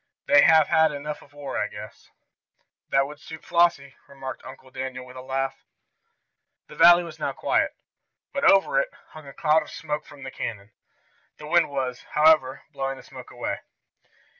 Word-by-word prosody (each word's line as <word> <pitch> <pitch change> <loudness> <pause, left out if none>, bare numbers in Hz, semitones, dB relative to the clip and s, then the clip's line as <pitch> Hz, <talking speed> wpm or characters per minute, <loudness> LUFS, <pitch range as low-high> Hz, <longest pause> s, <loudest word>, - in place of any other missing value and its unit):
"They 145 - +6
have 160 -2 +6
had 160 -1 +4
enough 150 +1 -6
of 140 - -19
war, 145 -2 -5
I - - 0
guess." - - -11 0.8
"That 135 0 +3
would 145 +1 -10
suit 160 0 -11
Flossie," 170 -6 +2
remarked 135 -2 -8
Uncle 130 0 -13
Daniel 130 -1 -6
with 125 0 -14
a 130 - -8
laugh. 135 +1 -3 1.0
The - - -13
valley 175 +1 +7
was 170 -2 -10
now - - -2
quiet, - - 0 0.6
but 280 0 -2
over 195 - +5
it - - -2 0.2
hung 155 -2 -13
a 140 - -10
cloud 155 +1 +3
of 150 - -10
smoke 150 -1 -5
from 145 -2 -13
the 135 - -7
cannon. 105 -4 -6 0.7
The 150 - -10
wind 165 +1 +3
was, 130 -3 -3
however, 150 -4 +4
blowing 135 0 -4
the - - -13
smoke - - -12
away. - - -4
145 Hz, 175 wpm, -25 LUFS, 130-160 Hz, 1.0 s, valley